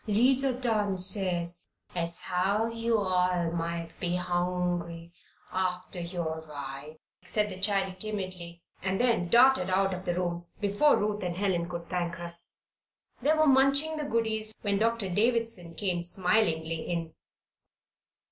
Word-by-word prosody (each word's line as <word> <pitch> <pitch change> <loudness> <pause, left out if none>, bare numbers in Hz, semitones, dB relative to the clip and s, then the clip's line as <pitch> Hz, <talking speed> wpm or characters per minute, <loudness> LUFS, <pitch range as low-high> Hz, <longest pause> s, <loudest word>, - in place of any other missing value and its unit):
"'Liza 260 +5 +4
done 220 -6 0
sez 180 -2 0 0.3
as 170 -1 -1
how 190 +4 +1
yo' 230 0 0
all 180 -3 +1
might 170 0 -3
be 175 -1 -1
hongry 175 -1 -2 0.4
aftah 185 -1 -1
yo' 170 -2 -4
ride," 140 +1 -7 0.3
said 210 -1 -1
the 185 - -7
child, 195 -2 +1
timidly, 185 -5 -3 0.2
and 190 0 -1
then 235 -8 +2
darted 255 +3 +5
out 195 +1 +2
of 185 +1 -6
the 175 - 0
room 175 -1 -3
before 205 +9 +3
Ruth 210 0 -1
and 175 -2 -3
Helen 180 -3 0
could 170 -1 -6
thank 175 -2 -2
her. 170 0 -8 0.9
They 295 +5 +3
were 310 0 +3
munching 280 +3 +4
the 300 - -3
goodies 220 -3 -1
when 200 -2 +1
Doctor 230 -2 +1
Davison 215 -3 0
came 180 -3 -1
smilingly 170 -3 +1
in. 165 -2 -4
185 Hz, 140 wpm, -29 LUFS, 170-215 Hz, 0.9 s, darted